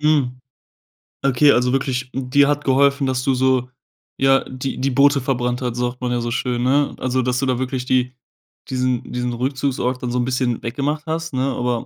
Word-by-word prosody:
Hm. 140 -5 +1 0.9
Okay, 140 +2 +5
also 125 0 +2
wirklich, 130 -1 -1
dir 135 +2 +2
hat 145 0 0
geholfen, 140 +1 +3
dass 130 -1 -1
du 135 - +2
so 130 -1 +1 0.5
ja, 135 0 +4
die 130 +1 -4
die 135 +2 +1
Boote 140 +1 +4
verbrannt 125 -1 -1
hat, 125 -2 -2
sagt 125 0 -3
man 125 -1 -1
ja 120 -1 0
so 120 - -3
schön, 120 -1 -1
ne? 140 +3 +2
Also, 130 0 0
dass 125 0 0
du 135 - 0
da 130 -1 0
wirklich 130 -1 -3
die 125 -1 +1 0.6
diesen 130 -1 0
diesen 125 0 -2
Rückzugsort 130 0 -1
dann 125 - -2
so 125 - -1
'n 120 - 0
bisschen 125 -2 -1
weggemacht 140 +6 -2
hast, 165 -1 -3
ne? 130 - 0
Aber 120 -1 -1
130 Hz, 195 wpm, -20 LUFS, 125-135 Hz, 0.9 s, Okay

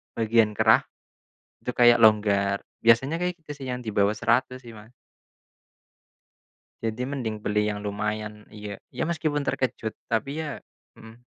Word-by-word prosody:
bagian 110 -1 +2
kerah - - +5 0.8
itu - - -6
kayak 120 -1 +6
longgar. 100 -2 +4 0.2
Biasanya 130 +9 +3
kayak 180 0 -1
gitu - - -7
sih - - -5
yang 125 0 -3
di 110 - -4
bawah 100 0 +4
Rp100.000 120 +3 +1
sih 115 - -10
Mas. 110 +3 -14 1.9
Jadi 115 +1 -2
mending 125 -5 -3
beli 105 0 +1
yang 105 - -3
lumayan 105 +1 -3 0.2
iya 105 -2 -8
iya - - -2
meskipun 150 -3 -1
terkejut, 120 -5 -2 0.2
tapi 115 +3 0
ya 155 - -4 0.5
hmm. 110 +2 -14
115 Hz, 145 wpm, -25 LUFS, 105-125 Hz, 1.9 s, kayak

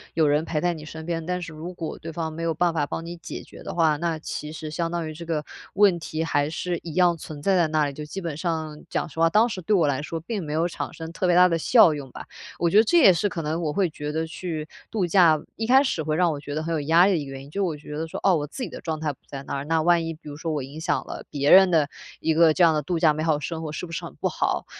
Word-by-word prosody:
有 160 -2 +3
人 150 +2 +2
陪 160 -2 -2
在 175 +3 +1
你 155 -2 -9
身 160 +1 -8
边， 165 -1 -2
但 180 0 -1
是 165 -2 -7
如 160 +3 -7
果 165 -2 -5
对 165 - -7
方 160 -1 -4
没 165 - -6
有 165 - 0
办 175 +1 +2
法 155 -3 0
帮 165 - -5
你 170 +1 -6
解 165 - -8
决 - - -14
的 - - -5
话， 160 -3 +3
那 165 0 -1
其 150 -1 -5
实 155 -1 -7
相 165 +1 -2
当 170 -2 -2
于 155 - -6
这 165 +2 -9
个 155 -3 -2 0.3
问 200 -3 +4
题 160 0 -3
还 145 -3 0
是 175 +2 -3
一 165 -3 -7
样 180 -2 +4
存 150 -1 -9
在 195 +5 +2
在 175 -3 +3
那 155 -1 +1
里。 140 - -3
就 150 - -7
基 150 +6 -6
本 170 -5 -4
上 160 -2 -3
讲 - - -1
实 160 0 -10
话， 165 0 +5
当 215 +7 +4
时 195 -5 -5
对 205 +5 +1
我 165 -6 +3
来 135 -1 0
说 165 +2 -4
并 195 +3 -4
没 150 - -6
有 165 +2 +1
产 175 - -5
生 160 0 -7
特 185 - -1
别 175 - +4
大 180 +1 +7
的 165 -2 +1
效 170 -1 +6
用 140 -3 -7
吧， - - -9 0.3
我 170 - +2
觉 200 - +3
得 215 - +8
这 345 +10 +3
也 225 - +8
是 205 +5 0
可 170 - -4
能 160 +3 -2
我 155 -3 -1
会 185 +4 +1
觉 150 -1 -5
得 160 +1 -1
去 160 -2 -5 0.2
度 205 -5 0
假， 170 -3 +5 0.2
一 225 - -3
开 265 +3 +6
始 260 - -1
会 155 0 -1
让 175 0 +3
我 145 - -4
觉 145 0 -6
得 155 - -2
很 165 +1 -2
有 155 - 0
压 165 +5 +5
力 200 - +3
的 185 - +2
一 145 - -5
个 135 - -9
原 135 0 -8
因。 140 - -13
就 200 +5 -1
我 165 -5 -1
觉 150 0 -8
得 160 +1 -3
说， - - -6
哦， 190 -2 +5
我 150 -2 -1
自 255 - -6
己 - - -4
的 - - -8
状 160 -2 -3
态 155 -1 -1
不 - - -25
在 140 -1 -7
那 - - -5
儿， 140 +1 -4
那 160 +1 +1
万 170 0 +3
一 165 - -3
比 155 0 -15
如 145 - -7
说 165 +1 -3
我 150 -3 -2
影 140 +4 -9
响 170 +2 -1
了 - - -7
别 145 0 +1
人 190 0 +8
的 155 -4 +3 0.3
一 160 - +1
个 160 0 +5
这 180 - +3
样 165 -1 +6
的 150 - 0
度 170 +4 -2
假 160 -2 +4
美 155 - -4
好 160 -1 +3
的 145 - -5
生 165 +1 -4
活， 155 -2 -5
是 155 - -5
不 165 - -11
是 165 - -4
很 - - -9
不 - - -1
好？ - - -1
160 Hz, 355 characters per minute, -24 LUFS, 155-175 Hz, 0.3 s, 得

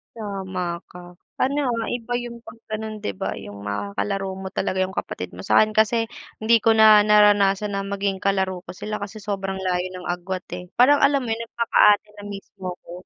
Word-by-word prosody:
Tama 190 -5 -4
ka, 175 0 -12 0.2
ano, 280 +3 +1
ah, 230 -2 -1
iba 245 0 -4
yung 235 -1 -7
'pag 230 - -12
ganon 215 0 -5
'di 100 - -4
ba - - -4
yung 100 0 -9
makakalaro 100 - -3
mo 190 0 -6
talaga 185 0 -1
yung 185 +1 -2
kapatid - - -4
mo. - - -8
Sa'kin 215 - +5
kasi 225 +1 +2 0.3
hindi 230 +1 +5
ko 225 0 +3
na 215 -1 +7
naranasan 205 -1 +4
na 195 - -2
maging 200 -1 -2
kalaro 190 -2 -1
ko - - -7
sila 210 +3 -5
kasi 205 +2 -7
sobrang 195 -2 -3
layo 180 -1 0
ng 180 -1 -7
agwat, 180 +1 -3
eh, 180 - -8
parang 265 +4 +6
alam 280 -1 +4
mo 245 - -5
yun 225 +1 -1
nagpaka-ate 210 -3 +3
na 205 - -10
mismo 195 -2 -7
'ko. - - -14
200 Hz, 195 wpm, -23 LUFS, 185-220 Hz, 0.3 s, na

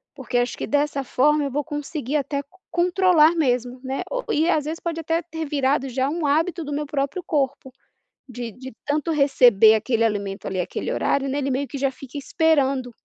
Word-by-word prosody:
porque 255 -3 -3
acho 245 +1 0
que, - - -4
dessa 290 -1 0
forma, 295 +3 +2
eu 275 - -3
vou 295 +3 -1
conseguir 295 -1 -3
até 280 0 -2
c - - -21 0.3
controlar 350 -2 +4
mesmo, 250 -4 0
né, 265 +1 -3
ou - - -2
e 320 +3 +2
às 305 -4 +1
vezes 320 +2 -4
pode 335 -1 -3
até 325 +1 0
ter 320 -1 -6
virado 275 -1 0
já 260 +2 0
um 325 0 -2
hábito 325 +4 +1
do 290 - -4
meu 295 +1 -2
próprio 280 +5 -2
corpo, 275 -3 -1 0.6
de 245 -2 -6
de 260 +3 -10
tanto 305 +3 0
receber 245 -7 +5
aquele 230 +1 0
alimento 200 -3 -2
ali, 185 -1 -2
aquele - - -3
horário, 275 0 0
né, 275 +2 -1
ele 275 -1 -1
meio 270 +2 -2
que 280 - -6
já 275 0 +1
fica 275 +2 -9
esperando. 275 -4 +1
280 Hz, 200 wpm, -23 LUFS, 260-310 Hz, 0.6 s, receber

